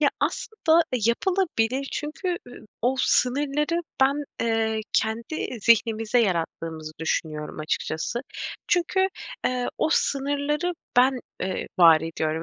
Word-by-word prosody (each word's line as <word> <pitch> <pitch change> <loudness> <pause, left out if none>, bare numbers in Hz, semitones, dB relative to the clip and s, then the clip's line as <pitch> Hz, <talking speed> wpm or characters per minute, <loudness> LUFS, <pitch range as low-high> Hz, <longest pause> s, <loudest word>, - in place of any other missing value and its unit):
Ya, 285 -2 +4
aslında 340 -7 +2 0.2
yapılabilir. 275 - +1
Çünkü, 345 +4 -3
ııı, 245 -2 -12 0.2
o 250 +2 +3
sınırları 290 +6 +1 0.2
ben, 280 +2 +3 0.2
eee, 225 -1 +1
kendi 230 +4 -1
zihnimizde 225 +1 +3
yarattığımızı 165 -6 -1
düşünüyorum 155 -1 -2
açıkçası. 160 +8 -2 0.5
Çünkü, 375 +2 +2 0.4
ııı, 250 -1 -1
o - - +2
sınırları 285 +4 0 0.2
ben, 255 0 +4 0.2
ııı, 185 0 -2
var 165 -2 +8
ediyorum. 160 0 -2
245 Hz, 105 wpm, -25 LUFS, 190-295 Hz, 0.5 s, var